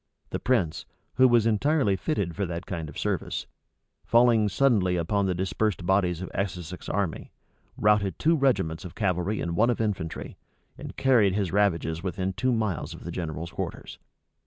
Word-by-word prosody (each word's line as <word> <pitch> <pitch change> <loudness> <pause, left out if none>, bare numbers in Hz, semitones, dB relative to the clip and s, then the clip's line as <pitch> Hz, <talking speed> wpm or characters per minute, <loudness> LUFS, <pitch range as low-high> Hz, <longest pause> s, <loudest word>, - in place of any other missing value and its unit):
The - - -2
prince, 95 -8 0 0.3
who 130 0 +7
was 120 -3 +4
entirely 115 0 +2
fitted 95 - -2
for 100 -2 -1
that 85 +1 -5
kind 80 -4 -5
of - - -10
service, - - -2 0.6
falling 115 -3 +4
suddenly 100 -6 +2
upon 95 +4 0
the 90 - 0
dispersed 95 0 -1
bodies 90 -2 +1
of - - -7
Essex's 90 -3 -4
army, 95 -4 -2 0.5
routed 105 -2 +2
two 165 +2 +3
regiments 100 - +1
of 90 - -9
cavalry 95 0 0
and 85 0 -2
one 115 +6 +3
of 120 - 0
infantry, 100 -7 -3 0.4
and - - -9
carried 115 -8 +4
his 100 -5 -1
ravages 85 -5 +1
within 95 +1 -2
two 130 +6 0
miles 100 -8 -2
of - - -12
the 85 - -5
general's 85 -1 -5
quarters. - - -6
95 Hz, 165 wpm, -26 LUFS, 85-110 Hz, 0.6 s, who